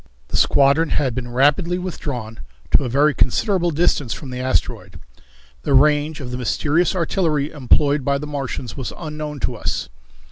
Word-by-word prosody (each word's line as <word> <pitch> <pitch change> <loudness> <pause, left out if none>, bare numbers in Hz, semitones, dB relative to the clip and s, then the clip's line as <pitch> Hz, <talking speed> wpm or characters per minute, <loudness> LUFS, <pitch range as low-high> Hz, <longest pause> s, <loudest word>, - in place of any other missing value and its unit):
The - - -5
squadron 140 +3 +3
had 135 -5 0
been 120 0 -5
rapidly 145 +8 +2
withdrawn 130 - -5 0.3
to - - +4
a 125 - -2
very 145 +4 +3
considerable 175 - +1
distance 150 -5 +1
from 135 -4 -9
the 125 - -5
asteroid. 130 +1 -2 0.6
The 135 - 0
range 150 +2 +3
of 125 -3 -7
the 125 - -4
mysterious 155 +8 +1
artillery 160 -4 0
employed 145 0 +2
by 140 +1 +1
the 145 - -6
Martians 135 -5 -5
was 130 - -5
unknown 150 -2 -6
to 125 - -1
us. - - -3
145 Hz, 165 wpm, -20 LUFS, 130-155 Hz, 0.6 s, to